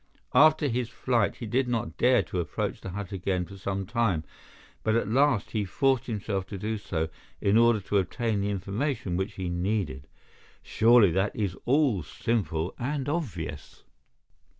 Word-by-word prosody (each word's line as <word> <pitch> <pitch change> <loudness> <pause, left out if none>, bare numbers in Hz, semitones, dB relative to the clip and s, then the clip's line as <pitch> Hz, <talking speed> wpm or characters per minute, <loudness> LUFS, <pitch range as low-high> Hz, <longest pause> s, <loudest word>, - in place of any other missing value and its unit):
After 155 +3 +6
his 120 -2 -1
flight 115 -3 0
he 120 - -7
did 125 +4 +1
not 120 -1 -2
dare 125 0 +4
to 90 - -4
approach 85 - -3
the - - -6
hut 100 +1 -6
again 95 -1 -1
for 100 - -11
some 95 0 -3
time, 115 -7 0 0.6
but 110 0 +1
at 115 - +1
last 125 -2 +2
he 110 -2 0
forced 130 +6 +1
himself 100 -4 -3
to 100 - -6
do 110 +3 -3
so 80 -5 -2 0.3
in 100 +1 +2
order 115 -1 +5
to 100 +1 +1
obtain 105 +3 -1
the 100 - -1
information 100 +1 -2
which 95 +3 -2
he 95 -2 -4
needed. 85 -6 -2 0.6
Surely 115 -4 +5
that 95 +4 0
is 100 -5 -1
all 130 - +3
simple 85 -2 -2
and 135 +2 -2
obvious?" 95 - -4
105 Hz, 165 wpm, -27 LUFS, 95-120 Hz, 0.6 s, After